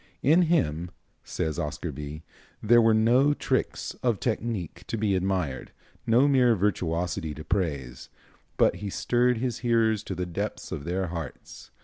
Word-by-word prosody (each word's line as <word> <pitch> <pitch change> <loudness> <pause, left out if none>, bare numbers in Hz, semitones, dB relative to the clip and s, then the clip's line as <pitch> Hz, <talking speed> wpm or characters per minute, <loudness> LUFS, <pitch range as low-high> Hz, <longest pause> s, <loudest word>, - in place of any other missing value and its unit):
"In 160 +6 +5
him," 85 - +1 0.3
says 80 -2 -3
Oscar 75 +2 -3
Bie, 75 +2 -7 0.4
"there 120 +2 +5
were 110 -1 +4
no 125 +6 +4
tricks - - -2
of 120 -5 +1
technique 110 -8 -3
to 115 - -3
be 105 -2 +1
admired, 90 -7 -2 0.4
no 120 +5 +5
mere 125 -4 +4
virtuosity 85 -5 -1
to 75 - -8
praise; 75 -9 -3 0.5
but - - +3
he 105 - -5
stirred 125 +4 +1
his 125 0 -2
hearers 115 -3 +2
to 95 - -4
the 90 +1 -2
depths 85 -2 -5
of 70 - -5
their 90 +1 -2
hearts. 85 -3 -8
100 Hz, 150 wpm, -27 LUFS, 80-120 Hz, 0.5 s, In